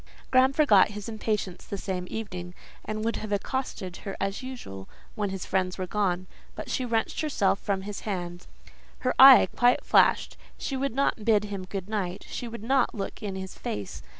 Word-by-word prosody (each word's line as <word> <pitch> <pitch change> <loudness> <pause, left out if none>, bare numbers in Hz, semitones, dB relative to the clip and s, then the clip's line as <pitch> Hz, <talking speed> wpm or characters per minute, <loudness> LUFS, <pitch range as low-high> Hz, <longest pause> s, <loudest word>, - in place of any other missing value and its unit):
Graham 260 +1 +5
forgot 270 -10 +5
his 210 -1 -7
impatience 215 -4 -3
the 200 - -5
same 185 -2 -4
evening, 180 -5 -6 0.3
and 215 0 -4
would 230 - 0
have 215 - -6
accosted 200 -4 -3
her 195 - -7
as 195 +3 -2
usual 240 - -8 0.2
when 205 -2 -2
his 190 -1 -5
friends 185 -1 -1
were 185 - -2
gone, 185 -2 -1 0.3
but - - -6
she 255 - -1
wrenched 230 -2 -1
herself 220 -11 +1
from 195 -2 -2
his 205 0 -5
hand; 175 -4 -5 0.5
her 255 - +1
eye 265 -1 +10
quite 245 +1 +3
flashed; - - +3 0.2
she 275 - -3
would 265 -2 -2
not 275 -5 +1
bid 210 -2 +3
him 200 -3 -5
good 190 0 -5
night; 195 -4 -3
she 245 - -5
would 230 -2 -8
not 260 +1 +2
look 200 - -5
in 200 -3 -4
his 190 -1 -6
face. 100 -2 -5
205 Hz, 185 wpm, -27 LUFS, 190-235 Hz, 0.5 s, eye